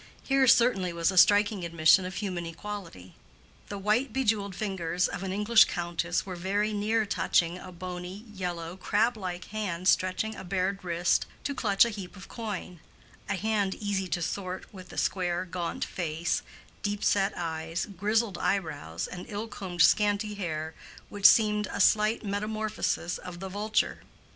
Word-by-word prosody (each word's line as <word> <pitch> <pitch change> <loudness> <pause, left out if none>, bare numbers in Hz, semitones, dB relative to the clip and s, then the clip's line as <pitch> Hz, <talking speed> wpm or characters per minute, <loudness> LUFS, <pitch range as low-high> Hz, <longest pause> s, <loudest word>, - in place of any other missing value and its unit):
Here 270 -1 +3
certainly 230 -7 +4
was 170 +2 +1
a - - -5
striking 205 0 +5
admission 170 +2 +4
of 185 +1 -6
human 180 -5 -3
equality. 165 - -8 0.6
The 205 - -4
white 215 +6 +1
bejewelled 215 -6 0
fingers 180 -4 -1
of - - -5
an 190 -1 -3
English 210 +3 +6
countess 175 0 -2
were 185 -2 -5
very 200 +4 0
near 215 +2 +1
touching 175 -3 +1
a 185 - -10
bony, 180 +3 -7
yellow, 175 -2 -4
crab 220 +5 +1
like 185 -4 -5
hand 185 -5 -3
stretching 185 +4 +2
a - - -8
bared 190 +1 -1
wrist 175 0 +1 0.2
to 285 - -2
clutch 210 -5 +4
a 235 - -2
heap 195 -4 -8
of 190 - -11
coin—a 200 -2 -7
hand 205 -1 0
easy 200 -3 -2
to 175 0 -1
sort 185 +2 -4
with 185 -2 -11
the - - -11
square, 180 -1 0
gaunt 175 -1 -3
face, 165 -1 -2 0.4
deep 205 0 -2
set 195 0 +2
eyes, 165 0 -3
grizzled 205 +1 0
eyebrows, 160 - -2
and 180 0 -8
ill 210 +2 -4
combed 185 -5 0
scanty 210 +3 +3
hair 160 -5 -4 0.4
which 205 -1 +6
seemed 210 -1 +4
a - - -4
slight 215 +1 +3
metamorphosis 210 -3 -2
of 175 -1 -8
the 190 +1 -5
vulture. 210 +3 0
195 Hz, 160 wpm, -28 LUFS, 175-210 Hz, 0.6 s, English